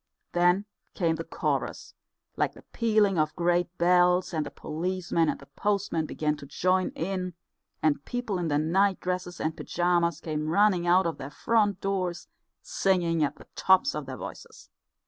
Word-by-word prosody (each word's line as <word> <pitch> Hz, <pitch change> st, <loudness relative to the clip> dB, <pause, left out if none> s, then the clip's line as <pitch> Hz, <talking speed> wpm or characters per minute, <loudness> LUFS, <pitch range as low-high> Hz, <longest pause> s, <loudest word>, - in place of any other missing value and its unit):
Then 175 Hz, +3 st, +3 dB, 0.3 s
came 165 Hz, -3 st, +1 dB
the 165 Hz, -, -4 dB
chorus, 165 Hz, -, -3 dB, 0.4 s
like -, -, 0 dB
the -, -, -15 dB
pealing 215 Hz, -5 st, +2 dB
of 155 Hz, 0 st, 0 dB
great 175 Hz, +1 st, +1 dB
bells, 180 Hz, +1 st, +3 dB
and 155 Hz, -2 st, 0 dB
the -, -, -5 dB
policeman 170 Hz, 0 st, -1 dB
and -, -, -2 dB
the 140 Hz, -, -13 dB
postmen 185 Hz, +1 st, -1 dB
began 150 Hz, -1 st, -1 dB
to 140 Hz, -, -10 dB
join 185 Hz, +5 st, +1 dB
in, 185 Hz, 0 st, -3 dB, 0.5 s
and 145 Hz, -2 st, +2 dB
people 240 Hz, -6 st, -3 dB
in 175 Hz, -, -1 dB
their 145 Hz, -2 st, +1 dB
nightdresses 180 Hz, +2 st, 0 dB
and 155 Hz, 0 st, -1 dB
pyjamas 170 Hz, -2 st, 0 dB
came 155 Hz, -2 st, -3 dB
running 185 Hz, -1 st, +3 dB
out 180 Hz, +2 st, +5 dB
of 165 Hz, -, -2 dB
their 135 Hz, 0 st, -6 dB
front 205 Hz, +2 st, +1 dB
doors, 185 Hz, -3 st, -2 dB, 0.4 s
singing 170 Hz, -4 st, +1 dB
at 145 Hz, -, -1 dB
the -, -, -15 dB
tops 190 Hz, +9 st, +4 dB
of -, -, -5 dB
their -, -, -6 dB
voices. -, -, -10 dB
175 Hz, 165 wpm, -27 LUFS, 165-190 Hz, 0.5 s, out